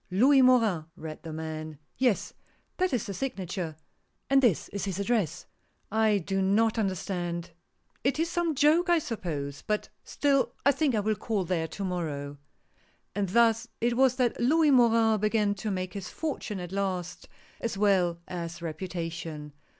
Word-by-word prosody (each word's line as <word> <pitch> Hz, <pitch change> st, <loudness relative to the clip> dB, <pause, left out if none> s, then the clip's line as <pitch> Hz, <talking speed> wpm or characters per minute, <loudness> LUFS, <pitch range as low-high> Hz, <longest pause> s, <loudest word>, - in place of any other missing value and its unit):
" -, -, -39 dB
Louis 265 Hz, +9 st, +5 dB
Morin," 225 Hz, -10 st, +4 dB
read 155 Hz, -1 st, -8 dB
the 160 Hz, -, -7 dB
man. 155 Hz, -1 st, -5 dB
" -, -, -42 dB
Yes, 250 Hz, -6 st, +1 dB, 0.4 s
that 370 Hz, -1 st, +1 dB
is 245 Hz, -5 st, 0 dB
the 200 Hz, -, -5 dB
signature 185 Hz, -, -4 dB, 0.3 s
— -, -, -47 dB
and 275 Hz, 0 st, +6 dB
this 230 Hz, -, +2 dB
is 200 Hz, 0 st, -4 dB
his 190 Hz, -3 st, -3 dB
address. 200 Hz, -6 st, 0 dB, 0.5 s
I 220 Hz, -1 st, +3 dB
do 195 Hz, +1 st, -1 dB
not 220 Hz, +4 st, +2 dB
under 195 Hz, -3 st, +1 dB
stand. 175 Hz, -2 st, -4 dB, 0.5 s
It 270 Hz, +3 st, +1 dB
is 325 Hz, +2 st, +1 dB
some 340 Hz, -2 st, 0 dB
joke 310 Hz, +6 st, +4 dB
I 345 Hz, -, +5 dB
suppose; 155 Hz, -, -4 dB
but 210 Hz, 0 st, -2 dB
still 280 Hz, -2 st, +1 dB
I 280 Hz, -, +7 dB
think 285 Hz, -3 st, +1 dB
I 210 Hz, -, +2 dB
will 215 Hz, +1 st, +1 dB
call 210 Hz, -2 st, -2 dB
there 165 Hz, -2 st, -1 dB
to 195 Hz, +5 st, -6 dB
morrow." 145 Hz, -6 st, -4 dB, 0.7 s
And 200 Hz, -1 st, -1 dB
thus 230 Hz, +2 st, +3 dB
it 235 Hz, +1 st, +1 dB
was 260 Hz, 0 st, +4 dB
that 250 Hz, -2 st, 0 dB
Louis 305 Hz, +4 st, +4 dB
Morin 230 Hz, -3 st, +4 dB
began 210 Hz, 0 st, +2 dB
to 205 Hz, +2 st, -4 dB
make 185 Hz, -2 st, -3 dB
his 195 Hz, -3 st, -6 dB
fortune 270 Hz, -10 st, -4 dB
at 175 Hz, -1 st, -6 dB
last, 180 Hz, -3 st, -3 dB, 0.3 s
as 230 Hz, -4 st, -3 dB
well 190 Hz, -4 st, +3 dB
as 170 Hz, -1 st, -5 dB
reputation. 165 Hz, -3 st, -5 dB
200 Hz, 175 wpm, -28 LUFS, 175-240 Hz, 0.7 s, I